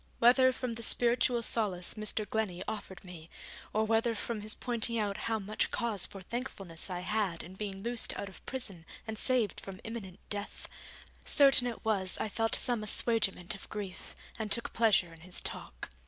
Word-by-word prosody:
Whether 255 +2 +6
from 250 -1 -3
the 230 - -4
spiritual 240 +1 +3
solace 195 -7 +1
Mr. 215 0 -1
Glennie 195 -5 -1
offered 205 -4 -5
me, 170 -3 -10 0.4
or 220 +1 +2
whether 225 +1 +2
from 220 0 -3
his 215 +1 -2
pointing 235 -1 -1
out 205 -2 0
how 225 - +2
much 210 +1 -1
cause 230 -6 -1
for 195 -1 -10
thankfulness 195 -7 -3
I 180 -1 -2
had 195 -3 0
in 180 - -10
being 195 -1 -5
loosed 235 0 +1
out 200 - -3
of 195 - -12
prison 195 -11 -2 0.2
and 220 -1 -4
saved 240 -1 +1
from 190 -1 -8
imminent 210 -5 -6
death, 205 0 -4 0.6
certain 275 -3 +6
it 235 -2 -5
was 195 -4 +1
I 220 - -1
felt 225 +2 +1
some 240 -4 +2
assuagement 210 -4 +2
of 195 - -10
grief, 200 -4 -6 0.2
and 215 -2 -3
took 235 - 0
pleasure 205 -7 +3
in 165 - -14
his 180 +2 -3
talk. - - -4
215 Hz, 180 wpm, -32 LUFS, 190-235 Hz, 0.6 s, Whether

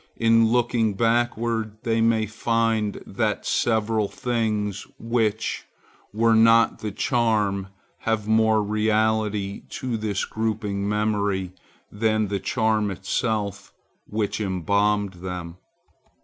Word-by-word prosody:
In 115 0 +4
looking 115 -2 +1
backward 115 -1 0
they 115 -1 +1
may 115 -1 +3
find 115 -1 -1
that - - -2
several 110 -2 +1
things 105 -4 -2
which 115 -2 -1 0.5
were 115 +2 +3
not 115 +1 +5
the 105 - -4
charm 105 -5 0 0.3
have 110 -2 -1
more 110 0 +3
reality 105 -1 0
to 125 -3 -3
this 105 -3 -2
groping 105 -2 -2
memory 105 -3 0 0.4
than 110 0 0
the 100 -1 -1
charm 110 -1 +1
itself 100 +1 -2 0.3
which 105 0 -2
embalmed 100 +1 +1
them. 90 -2 -6
110 Hz, 105 wpm, -24 LUFS, 100-115 Hz, 0.5 s, not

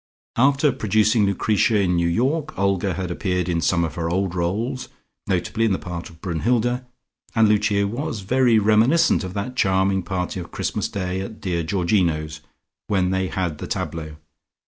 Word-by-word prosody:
After 140 +3 +4
producing 110 0 +2
Lucretia 105 +2 +2
in 90 -3 +2
New 85 0 +2
York, 145 - 0
Olga 100 -2 +1
had 90 -1 -3
appeared 90 -1 -1
in 85 -2 0
some 85 +2 +2
of 80 -3 -2
her 85 0 -2
old 95 +1 0
roles, 110 +10 -2 0.4
notably 115 - 0
in 110 -3 +3
the - - 0
part 85 -2 -6
of 80 -1 -18
Brunnhilde, 120 +8 0 0.5
and 110 -1 +5
Lucia 105 -1 +2
was 115 -1 -4
very 120 +3 +3
reminiscent 110 +8 +4
of 95 0 -6
that 105 +6 -3
charming 95 -2 +2
party 90 0 -3
of 85 - -7
Christmas - - -2
Day 95 -1 -3
at 110 +3 -7
dear 90 -4 -1
Georgino's, 80 -3 0 0.5
when 95 -2 +1
they 95 0 0
had 90 -5 -3
the - - -5
tableaux. 80 -2 -4
95 Hz, 170 wpm, -22 LUFS, 90-110 Hz, 0.5 s, and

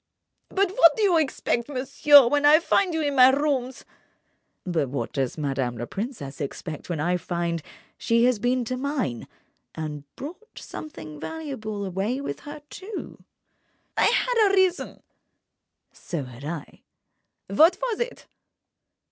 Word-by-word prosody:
"But 390 -1 +1
what 385 -4 +6
do 440 - +1
you 360 -5 +4
expect, 265 -4 -1
monsieur, 280 +1 +6
when 290 +3 +1
I 300 +2 +7
find 365 +2 +2
you 320 -1 -1
in 285 -1 0
my 255 -1 +8
rooms—?" 265 -2 -1 0.8
"But 160 -7 -1
what 140 - -4
does 135 0 -2
madame 135 -5 -2
la 120 - -4
princesse 195 - -6
expect 150 +3 -6
when 170 -3 -2
I 175 +4 +1
find 170 -1 -2 0.4
she 230 0 +2
had 245 -4 +2
been 245 0 +1
to 255 +2 -3
mine—and 155 - -6
brought 360 +11 -10
something 155 - -9
valuable 235 - -5
away 195 +7 -2
with 280 - -5
her, 295 0 -9
too!" 395 +2 -8 0.7
"I - - +3
had 470 -3 +3
a 395 - +2
reason—" 375 -1 +1 0.9
"So 165 -5 -5
had 125 +1 -10
I." 160 -1 -7 0.7
"What 320 - +5
was - - -2
it?" 485 +1 -4
255 Hz, 140 wpm, -25 LUFS, -, 0.9 s, my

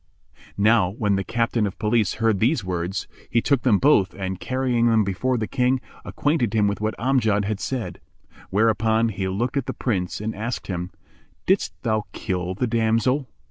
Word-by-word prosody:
Now 105 -2 +4
when 105 0 0
the 95 - -1
Captain 115 0 0
of 100 - -7
Police 110 -2 +1
heard 115 -3 +1
these 120 +2 +2
words, 90 +1 -3 0.2
he 115 - +3
took 135 +2 +1
them 115 -6 +4
both 105 -7 +3
and, 95 -1 -4
carrying 130 -2 +1
them 110 -2 +4
before 125 +7 -1
the 110 - -1
King, 125 +2 +1 0.2
acquainted 130 -8 0
him 105 -2 +3
with 100 +1 -2
what 110 +1 -1
Amjad 115 -5 +2
had 105 0 -2
said; 130 -2 -4 0.5
whereupon 110 +2 +2
he 95 -2 -3
looked 120 +8 -1
at 135 - -1
the - - -2
Prince 95 -8 -2
and 110 +1 -3
asked 115 +4 -4
him, 90 -1 -4 0.6
"Didst 80 - +1
thou 110 -2 0
kill 90 0 -3
the 125 - 0
damsel?" 115 +3 +1
110 Hz, 180 wpm, -23 LUFS, 100-120 Hz, 0.6 s, Now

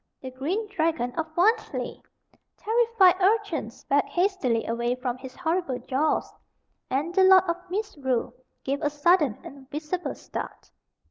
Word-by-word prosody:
The 260 - -7
green 335 - -2
dragon 320 -10 -1
of 325 +3 -2
Wantley! 430 +6 +1 0.6
Terrified 445 -5 +3
urchins 370 - 0
backed 285 +1 +1
hastily 350 - 0
away 235 +1 -1
from 250 -1 -3
his 260 -1 -10
horrible 335 -6 -1
jaws, 285 +5 -1 0.6
and 290 +7 -1
the 380 0 +4
Lord 375 -1 +7
of 340 -2 -1
Misrule 285 - -2 0.3
gave 275 +2 -2
a 295 - +1
sudden 295 - +3
and 270 -1 -12
visible 310 +5 -4
start. - - -8
315 Hz, 135 wpm, -26 LUFS, 260-375 Hz, 0.6 s, Lord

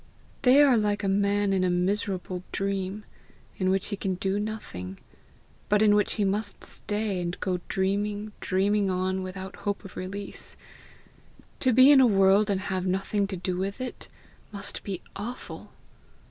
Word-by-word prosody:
They 270 +2 +7
are 265 -4 +5
like 210 -1 0
a - - +1
man 200 0 +2
in 190 -1 +2
a 185 - +2
miserable 185 0 -1
dream, 195 +1 -2 0.5
in 185 -1 +2
which 190 0 +1
he 205 - -2
can 190 -2 -2
do 195 +2 -1
nothing, 95 - -5 0.7
but 210 +1 +4
in 210 -1 +6
which 205 0 +2
he 210 - 0
must 200 +1 -2
stay, 205 -3 -3
and 175 0 -4
go 180 -2 -1
dreaming, 205 +2 -1
dreaming 200 +1 +1
on 185 +1 0
without 190 0 -7
hope 205 0 -3
of 195 - -10
release. 200 +2 -7 1.0
To 260 - +3
be 260 +4 +8
in 275 -2 +8
a 255 - +6
world 195 0 +4
and 195 -2 +1
have 190 -2 -2
nothing 195 +2 0
to 195 -1 -5
do 180 0 -2
with 195 +4 -3
it, 255 -1 -5 0.4
must 200 -1 -6
be 190 -3 -5
awful! 235 +5 -7
200 Hz, 165 wpm, -27 LUFS, 190-210 Hz, 1.0 s, be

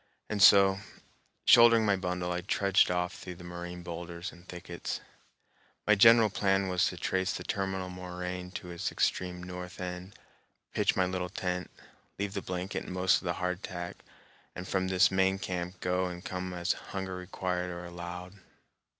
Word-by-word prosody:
And 105 -2 -1
so, 95 -1 +7 0.7
shouldering 115 -2 +8
my 100 -1 +4
bundle, 90 -1 -2
I 90 0 -1
trudged 100 +2 +3
off 90 0 0
through 90 - -8
the 90 - -12
moraine 90 0 -7
boulders 85 +1 -6
and 85 +1 -17
thickets. 90 -1 -5 0.9
My 105 - +6
general 115 +1 +7
plan 95 -1 +1
was 90 -1 +2
to - - -4
trace 95 0 0
the 90 - -5
terminal 95 -1 -2
moraine 90 0 -5
to 90 -2 -6
its 85 - -3
extreme 90 -1 -1
north 90 0 -7
end, 90 +1 -6 0.6
pitch - - +2
my 95 - +3
little 90 0 -2
tent, 90 0 -3 0.5
leave 100 0 -2
the 100 - -2
blanket 90 +1 -4
and - - -6
most 95 0 +4
of - - -8
the 85 - 0
hardtack, 90 -1 -4 0.6
and 90 0 -6
from 95 -1 0
this 95 0 +4
main 95 0 +3
camp 90 -1 -4
go 90 +1 +1
and 90 0 -7
come 90 -1 -4
as 90 +1 0
hunger 95 -1 -5
required 90 0 -3
or 90 0 -6
allowed. 85 +1 -7
90 Hz, 165 wpm, -30 LUFS, 90-95 Hz, 0.9 s, shouldering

